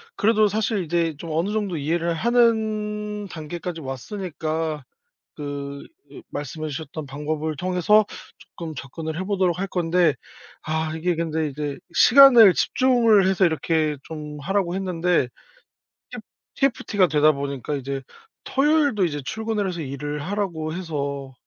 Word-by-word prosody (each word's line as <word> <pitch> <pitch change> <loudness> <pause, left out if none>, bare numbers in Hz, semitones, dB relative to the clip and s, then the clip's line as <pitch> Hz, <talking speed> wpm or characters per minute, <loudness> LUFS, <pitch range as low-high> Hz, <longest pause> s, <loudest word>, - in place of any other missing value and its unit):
그래도 215 0 +3
사실 215 0 -1
이제 165 -1 0
좀 165 +2 -7
어느 170 +6 0
정도 205 -5 -1
이해를 165 +3 0
하는 215 -1 0
단계까지 165 +1 -6
왔으니까 155 - -4 0.5
그 140 -1 -6 0.3
으 - - -10
말씀해 155 +2 -5
주셨던 155 +1 -6
방법을 150 +3 -3
통해서 185 +6 +3 0.5
쪼끔 165 -2 -6
접근을 155 +4 -6
해보도록 185 -2 0
할 195 - -2
건데. 175 -3 +2 0.5
아 160 0 -2
이게 175 +2 0
근데 160 -1 -1
이제 145 0 -4 0.2
시간을 240 -6 +8
집중을 230 -7 +3
해서 190 0 +3
이렇게 160 -2 0
좀 150 -1 -8
하라고 190 +2 -1
했는데 180 -6 0 0.8
팁 - - -7 0.4
TFT가 225 -8 +2
되다 155 0 +4
보니까 140 0 -4
이제 135 0 -4 0.4
토요일도 285 - +2
이제 145 -3 -4
출근을 220 +2 -2
해서 180 -3 -3
일을 145 +1 -4
하라고 170 -4 -3
해서 140 -6 -4
165 Hz, 295 characters per minute, -23 LUFS, 150-205 Hz, 0.8 s, 시간을